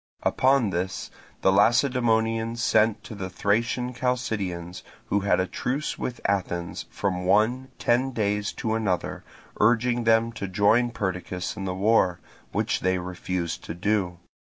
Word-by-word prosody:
Upon 130 -5 +3
this 95 +1 -3 0.3
the 95 - +4
Lacedaemonians 115 +1 +2
sent 110 -1 +3
to - - -9
the 95 -3 -5
Thracian 115 +6 0
Chalcidians, 100 -9 -2 0.3
who 100 - +2
had 100 -1 +2
a 95 - +2
truce 135 +9 -3
with 125 - -4
Athens 90 -3 -2
from 90 -3 -2
one 110 +8 +2
ten 125 +3 +1
days 105 -3 -1
to 110 - -2
another, 100 -6 -1 0.4
urging 120 +2 +3
them 115 +1 +4
to 100 -3 -5
join 105 +6 +3
Perdiccas 90 -4 -3
in 95 - -5
the 90 -1 -2
war, 95 -3 +3 0.3
which - - 0
they 95 0 +1
refused 90 -1 -4
to 80 - -5
do. 90 -1 0
105 Hz, 140 wpm, -26 LUFS, 95-115 Hz, 0.4 s, the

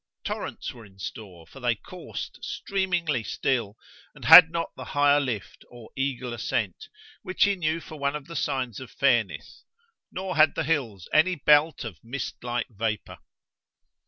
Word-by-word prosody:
Torrents - - -5
were 120 - -13
in 95 -2 -18
store, 95 -3 -8
for - - -14
they - - +1
coursed - - -8
streamingly 175 -9 -1
still 115 -3 -1 0.4
and - - -11
had 160 0 +11
not 165 0 -3
the - - -8
higher 145 0 +5
lift, 115 - -4
or 120 -2 -13
eagle 130 -3 -2
ascent, 435 - -3 0.3
which 185 -2 0
he 200 0 +3
knew 165 -2 -1
for 155 -2 -11
one 140 +1 0
of 150 -2 -6
the 165 - -10
signs 130 -8 -2
of 130 - -9
fairness, 120 -7 0 0.5
nor 185 0 -4
had 155 -1 +5
the 165 - -1
hills 130 - -2
any 180 +4 +4
belt 150 +1 +3
of 110 -9 -9
mist 120 +2 -6
like 120 -1 -2
vapour. 110 -2 -4
140 Hz, 160 wpm, -26 LUFS, 115-160 Hz, 0.5 s, had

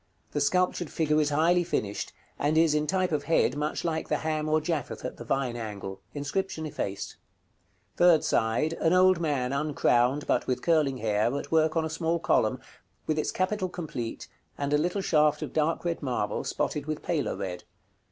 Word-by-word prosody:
The 145 - -1
sculptured 180 +2 +1
figure 155 -1 +1
is 150 - +1
highly 165 +4 +3
finished, 105 -12 -2 0.3
and 150 +2 +1
is 160 -2 +4
in 150 0 +1
type 185 0 +1
of 150 -2 -1
head 160 -5 +2
much 150 +1 -2
like 160 -2 -2
the 150 - +2
Ham 155 0 -2
or 155 0 +3
Japheth 155 -3 -3
at - - -5
the - - -7
Vine 135 -3 -1
angle. 100 -4 -6
Inscription 160 +4 -2
effaced. 100 -9 -4 0.8
Third 175 -3 +5
side. 115 +8 +1
An 165 - +3
old 185 -1 +5
man, 140 -6 0
uncrowned, 140 -2 +2
but - - 0
with 125 - -1
curling 155 -6 +2
hair, 110 +3 +1
at - - -6
work 160 0 +3
on 160 - +1
a - - -1
small 165 +1 -1
column, 165 - +1 0.5
with 155 0 0
its - - -1
capital 185 0 -1
complete, 145 -10 -5 0.3
and 140 0 -1
a - - +5
little 180 +5 0
shaft 150 -5 +2
of - - -6
dark 160 +2 0
red 170 -1 -1
marble, 130 -4 -2
spotted 145 -1 -2
with 155 -1 -3
paler 160 -5 -1
red. 90 -2 -5
155 Hz, 185 wpm, -28 LUFS, 135-165 Hz, 0.8 s, Third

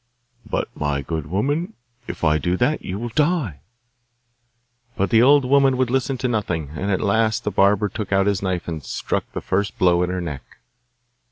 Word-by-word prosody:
'But, - - -1
my 70 -1 -2
good 80 0 -4
woman, 145 - -1 0.3
if - - -7
I 75 -1 +3
do 90 +2 0
that 135 +8 +1
you 90 - -5
will 120 +3 -4
die!' 145 - 0 1.4
But 100 - 0
the 115 - +6
old 140 +2 +5
woman 135 0 +4
would 130 -2 0
listen 135 0 0
to 130 +1 -1
nothing; 90 - -2
and 95 +6 -3
at 95 - 0
last 110 +2 +1
the 105 - -1
barber 100 +2 +3
took 105 +1 -6
out 95 0 +3
his 100 -2 +1
knife 95 -3 -2
and 80 -4 -5
struck - - -3
the - - -4
first 100 +1 -1
blow 90 -1 +3
at 90 - 0
her 90 0 -2
neck. 75 -6 -5
100 Hz, 190 wpm, -22 LUFS, 90-125 Hz, 1.4 s, the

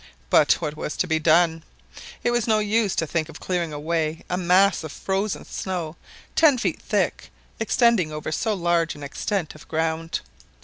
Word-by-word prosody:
But 150 - +6
what 150 -3 -4
was 150 - -5
to - - +1
be 160 0 +1
done? 165 +1 +3 0.6
It 240 - +2
was 240 -2 0
no 220 -1 +4
use 215 -1 +1
to 165 - +1
think 160 0 -2
of 160 - -10
clearing 175 -3 -2
away 155 +1 -2
a - - +2
mass 185 +1 +3
of 155 - -6
frozen 195 +4 -2
snow 175 -4 -4 0.4
ten 300 -5 +5
feet 240 - -2
thick, - - -1 0.3
extending 220 -6 +3
over 155 0 -5
so 215 +7 0
large 170 -2 +1
an 145 - -10
extent 165 +4 -3
of 155 - -15
ground. 160 +1 -1
170 Hz, 175 wpm, -24 LUFS, 155-200 Hz, 0.6 s, But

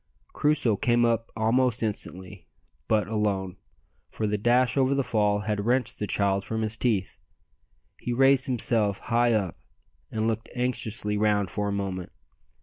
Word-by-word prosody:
Crusoe 145 -8 +1
came 120 +2 +2
up 115 -1 0
almost 115 +1 +1
instantly, 95 -3 -6 0.4
but 105 -3 +2
alone, 100 -4 -1 0.5
for 110 - -3
the 105 0 0
dash 120 +4 +2
over 135 0 +2
the 140 - +1
fall 105 -4 +1
had 105 -1 -2
wrenched 125 +1 0
the 105 - -2
child 100 -1 0
from 110 +2 -3
his 110 0 +1
teeth. 110 -5 -1 0.8
He 120 - -4
raised 135 +2 +4
himself 110 -5 +1
high 120 0 +1
up, 100 -6 -1 0.5
and 110 0 -1
looked 115 0 -2
anxiously 115 -4 -2
round 105 -2 +1
for 105 -1 -2
a - - -1
moment. 95 -3 -4
110 Hz, 150 wpm, -26 LUFS, 105-120 Hz, 0.8 s, raised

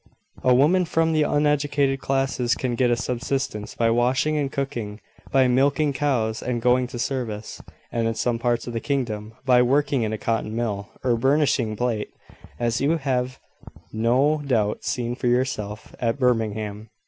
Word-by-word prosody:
A 125 -1 +5
woman 170 +8 +4
from 165 0 +1
the 155 - +2
uneducated 145 -2 +1
classes 135 -3 0
can 125 -2 -2
get 125 +1 +2
a 120 - +3
subsistence 120 -2 -3
by 115 -1 +2
washing 125 +6 +2
and 140 -2 -1
cooking, 115 -6 -4 0.3
by 135 -1 +4
milking 140 +4 +2
cows 125 -6 0
and 125 -1 -2
going 125 +1 +2
to 120 - -7
service, 120 -4 -4 0.3
and, 115 -1 0
in 115 - -1
some 115 +1 0
parts 120 0 0
of 120 - -6
the 115 - -1
kingdom, 115 -6 -3
by 125 -2 +5
working 140 +1 +2
in 110 -1 -1
a 110 - -2
cotton 110 0 -2
mill, 105 -4 -2
or 125 -2 +2
burnishing 135 -4 +2
plate, 115 -2 -1 0.5
as 120 0 0
you 155 +4 +2
have 130 -3 -2 0.5
no 130 +7 +2
doubt 110 -7 0
seen 120 -1 -2
for 125 - -2
yourself 120 -4 -1
at 115 0 0
Birmingham. 110 -4 -1
125 Hz, 165 wpm, -24 LUFS, 115-135 Hz, 0.5 s, A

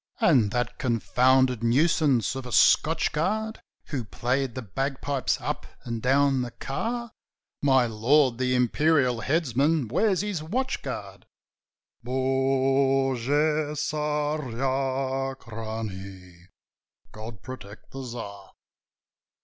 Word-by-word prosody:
"And 125 -11 +4
that 120 +4 -2
confounded 125 0 +2
nuisance 140 0 +2
of 135 -1 -6
a - - -8
Scotch 160 +6 +4
Guard 215 +8 -1 0.3
Who 135 -5 -2
played 125 +4 -2
the 130 - -4
bagpipes 135 +5 -2
up - - -4 0.2
and 115 -2 -4
down 135 +1 +3
the 125 - -3
car?" 230 - -4 0.5
"My 130 -3 +4
lord, 120 +3 +2
the 125 0 +1
imperial 125 -1 +2
headsman 145 -1 +1
wears 185 - +2
his 205 -6 -3
watch 255 +12 -2
guard: - - -7 0.8
Bogu 135 +3 +1
Tsarachnie! 130 - -3 0.6
God 110 -2 -9
protect 110 -5 -10
the 135 0 -6
Tsar!" 105 -5 -8
130 Hz, 100 wpm, -26 LUFS, 120-150 Hz, 0.8 s, And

